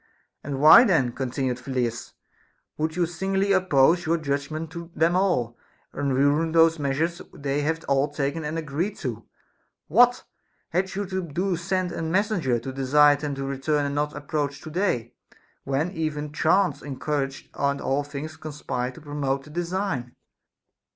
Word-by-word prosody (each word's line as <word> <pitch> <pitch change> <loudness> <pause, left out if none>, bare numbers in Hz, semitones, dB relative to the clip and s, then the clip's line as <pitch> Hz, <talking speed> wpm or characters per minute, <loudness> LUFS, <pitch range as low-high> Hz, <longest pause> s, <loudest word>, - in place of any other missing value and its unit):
And 140 -2 -4
why 160 - +9
then, 160 - +2
continued 130 0 -2
Phyllidas, 125 -3 -3 0.6
would 155 +1 -2
you 175 -1 +2
singly 195 +3 -1
oppose 175 -2 +3
your 165 +1 +2
judgment 155 +1 -3
to 170 0 -8
them 165 +3 +2
all, 125 -12 +1 0.3
and 140 -2 -1
ruin 145 +4 +2
those 165 -1 +5
measures 155 +5 -1
they 140 +1 -2
have 160 +2 -2
all 140 +1 +2
taken 145 +2 -2
and 150 +2 -3
agreed 165 +6 -2
to 115 -4 -5 0.3
\ - - -47
What 245 +1 +5 0.5
had 185 +3 -1
you 200 +1 -2
to 190 0 -3
do 180 +4 -2
to - - +2
send 180 +1 -1
a 170 - -4
messenger 170 - +1
to 130 +3 -6
desire 145 +2 +5
them 145 -1 -4
to 135 - -4
return 140 +2 0
and 140 - -2
not 150 +1 -1
approach 145 -1 -2
to 155 - -9
day, 150 - -1 0.5
when 140 +6 0
even 150 -3 -3
chance 155 -1 +2
encouraged 135 -1 -3
and 140 0 0
all 140 +2 0
things 145 +2 -7
conspired 145 -5 -4
to 165 - -12
promote 140 -2 -2
the 150 - -14
design 170 -6 -3
150 Hz, 165 wpm, -25 LUFS, 140-170 Hz, 0.6 s, why